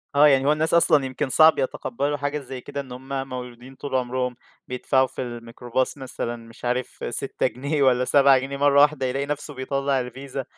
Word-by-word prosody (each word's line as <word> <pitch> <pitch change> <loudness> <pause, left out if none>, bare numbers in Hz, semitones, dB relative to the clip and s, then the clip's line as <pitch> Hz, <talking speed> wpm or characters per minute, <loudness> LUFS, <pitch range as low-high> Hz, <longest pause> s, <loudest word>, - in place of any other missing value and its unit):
آه، 150 +1 +7
يعني 135 -1 +3
هو - - +5
الناس 155 +2 0
أصلًا 155 -4 +5
يمكن 130 +1 -3
صعب 155 +2 +6
يتقبَّلوا 140 +2 -2
حاجة 145 +2 -2
زي 130 -2 -8
كده، 140 - -5
إن 130 -2 -13
هُم 135 +1 -5
مولودين 125 +1 -8
طول 140 -1 -5
عمرهم 125 0 -1 0.3
بيدفَعوا 130 +1 +1
في - - -7
الميكروباص 120 +2 -3
مثلًا 125 -3 -5
مش 115 +1 -13
عارِف 125 +1 -3
6 - - -1
جنيه 140 +3 -2
والّا 125 -1 +3
7 140 0 +5
جنيه، 135 +2 -5
مرَّة 140 0 +4
واحدة 145 -2 +3
يلاقي 135 +2 -1
نفْسه 145 0 -4
بيطلَّع 135 -1 -1
الVISA. 135 +2 -7
135 Hz, 185 wpm, -23 LUFS, 125-140 Hz, 0.3 s, آه